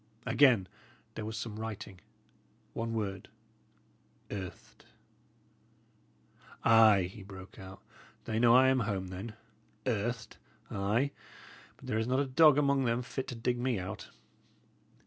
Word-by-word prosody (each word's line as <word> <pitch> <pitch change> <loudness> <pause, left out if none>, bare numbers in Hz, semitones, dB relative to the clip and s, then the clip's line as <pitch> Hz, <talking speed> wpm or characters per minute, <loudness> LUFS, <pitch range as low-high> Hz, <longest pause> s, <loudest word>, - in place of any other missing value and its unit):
Again 120 -10 +4 0.5
there 110 - -5
was 110 0 -5
some 110 0 -5
writing: 105 -4 -7 0.7
one 115 0 -3
word 95 -3 -3 1.0
"Earthed." 95 -3 -8 1.8
"Ay," 110 -4 +6
he 95 +4 -7
broke 95 -1 -11
out, 95 0 -11 0.4
"they 110 0 -1
know 120 0 +6
I 130 +1 +7
am 130 0 +3
home, 100 -5 -2
then. 100 +4 -7 0.5
Earthed! 120 -1 -2 0.3
Ay, 110 +8 0 0.7
but - - -14
there 110 - -1
is 110 - -1
not 130 +1 +2
a 140 - +2
dog 145 +2 +6
among 140 -2 +2
them 120 +1 0
fit 130 +1 -5
to 125 - -5
dig 120 +1 -1
me 125 -2 0
out." 95 +2 -6
110 Hz, 130 wpm, -31 LUFS, 100-125 Hz, 1.8 s, I